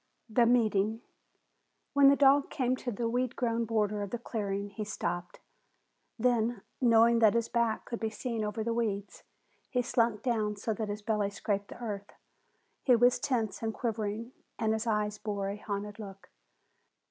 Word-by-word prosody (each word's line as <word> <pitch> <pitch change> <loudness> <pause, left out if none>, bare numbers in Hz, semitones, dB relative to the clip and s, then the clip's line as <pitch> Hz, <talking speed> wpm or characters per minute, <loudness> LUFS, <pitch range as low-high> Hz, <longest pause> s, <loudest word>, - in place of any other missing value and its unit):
THE 235 +1 +3
MEETING 220 -2 +2 0.9
When 280 -1 +7
the 280 - +7
dog 280 0 +5
came 255 -3 0
to 245 - -4
the 230 +2 -2
weed 250 +2 -1
grown 230 -1 0
border 210 -2 0
of 200 - -3
the 240 - -3
clearing, 205 -3 -3
he 215 +2 -4
stopped. 175 -4 -4 0.8
Then, 235 -2 +1 0.2
knowing 230 -1 +5
that 220 -1 +5
his 230 -1 +1
back 235 -2 0
could 235 - -5
be 220 - -1
seen 225 +1 -3
over 210 +1 -2
the 230 +1 -1
weeds, 205 -4 -2 0.5
he 250 -2 0
slunk 230 -3 +1
down 220 -4 0
so 220 +2 -2
that 215 0 -4
his 205 0 -5
belly 210 -2 0
scraped 200 0 -2
the - - -11
earth. 205 -4 -5 0.7
He 250 - +5
was 245 +1 +4
tense 240 -8 -1
and 220 -1 -2
quivering, 225 0 -3 0.3
and 220 0 +1
his 220 +2 -2
eyes 210 -1 0
bore 200 -2 -2
a 200 - -4
haunted 205 0 -5
look. 195 -3 -10
220 Hz, 170 wpm, -30 LUFS, 205-235 Hz, 0.9 s, When